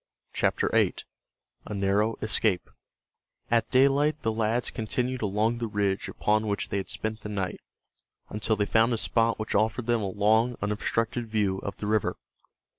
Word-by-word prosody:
CHAPTER - - +1
VIII—A 105 - -3
NARROW 100 +3 +1
ESCAPE 110 -3 +1 0.8
At 115 -1 +2
daylight 140 +3 +3
the 110 - +1
lads 110 +2 0
continued 125 +2 -2
along 110 +3 0
the 115 - -2
ridge 100 -2 -1
upon 110 +1 0
which 100 -1 -1
they 100 - -1
had 95 - -4
spent 110 0 -3
the 105 - -6
night, 95 -3 -3 0.7
until 110 +1 -1
they 105 0 0
found 115 +3 +3
a - - 0
spot 115 0 +1
which 110 - -4
offered 110 +3 +1
them 120 -1 +1
a 100 - -2
long, 110 +5 +2
unobstructed 115 +3 -1
view 105 -3 0
of 100 - -6
the - - -5
river. 110 0 0
110 Hz, 160 wpm, -27 LUFS, 105-115 Hz, 0.8 s, daylight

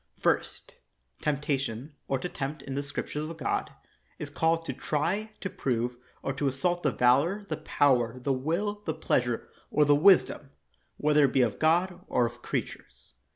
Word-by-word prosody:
First. - - -1 0.5
Temptation, 140 -2 -2
or 135 - +1
to 130 - -4
tempt, 140 -3 -5
in 135 - -6
the 140 - -1
Scrip 140 -1 -5
tures 150 +1 -3
of 165 - -8
God, - - -1 0.5
is 145 -1 -6
called 165 +2 +1
to - - -3
try, 175 +9 -1
to 195 - -2
prove, 125 -1 -1 0.3
or 135 - -1
to 140 +1 -1
assault 175 +7 0
the 150 - +2
valor, 145 +14 +3
the 155 - -2
power, 125 -4 +2
the 135 +2 0
will, 175 +10 -1
the 160 - -1
pleas 125 -5 +1
ure, 120 -2 -3 0.2
or 150 - +3
the 145 - +5
wisdom— 155 -3 +4 0.5
whether 150 -1 +4
it 135 - 0
be 135 - +4
of - - -1
God 175 +3 +2
or 125 - +2
of 120 +1 -6
creatures. - - -6
145 Hz, 180 wpm, -28 LUFS, 130-165 Hz, 0.5 s, the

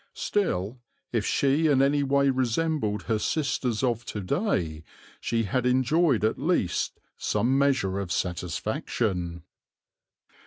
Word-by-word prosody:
Still, 120 - -1 0.3
if 115 -3 0
she 140 +4 +2
in 140 -3 +4
any 140 +2 +3
way 140 0 +3
resembled 130 -3 0
her 110 -2 0
sisters 130 -4 -1
of 120 -2 0
to 105 - -5
day, 90 - -1 0.4
she 115 -1 0
had 125 +5 0
enjoyed 130 0 +3
at 110 - 0
least 145 - 0 0.2
some 125 +3 +1
measure 130 -9 +2
of 95 -3 -4
satisfaction. 90 0 -2
125 Hz, 120 wpm, -26 LUFS, 100-140 Hz, 0.4 s, in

